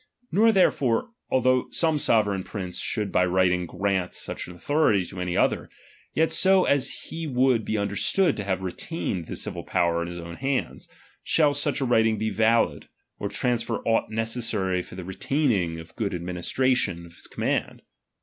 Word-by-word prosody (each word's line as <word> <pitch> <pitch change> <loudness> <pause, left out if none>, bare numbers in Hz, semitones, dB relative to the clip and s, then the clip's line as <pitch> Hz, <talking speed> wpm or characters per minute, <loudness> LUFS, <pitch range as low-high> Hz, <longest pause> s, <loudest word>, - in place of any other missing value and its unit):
Nor 225 +3 +5
therefore, 180 - +2 0.2
although 130 -1 +2
some 160 -3 +2
sovereign 105 -7 +2
prince 95 -4 -5
should 105 -3 -2
by 90 - +3
writing 90 -1 +2
grant 95 -2 -1
such - - -5
an 90 - -10
authority 105 - +2
to 90 +1 -7
any 90 -1 -2
other, - - +1 0.5
yet 160 +1 +2
so 190 -1 +4
as 140 -2 +2 0.2
he 165 0 -4
would 125 -3 +2
be 110 - -2
understood 105 - +1
to 105 - -3
have 95 -1 -2
retained 95 - -4
the - - -5
civil - - -5
power 85 -1 +1
in 85 - -3
his 85 0 -7
own 85 0 -8
hands, 135 0 -2 0.3
shall 150 -3 +3
such 145 0 0
a - - +1
writing 110 -2 +3
be 110 +1 -1
valid, 110 +3 +1 0.3
or - - -3
transfer 120 -2 0
aught 115 0 +2
neces 115 +2 -1
sary 95 -4 0
for 90 - -12
the 95 - -6
retaining 95 - 0
or - - -7
good 100 -4 -2
administration 90 +2 -1
of 85 - -15
his - - -10
command. - - -2
110 Hz, 175 wpm, -25 LUFS, 90-130 Hz, 0.5 s, Nor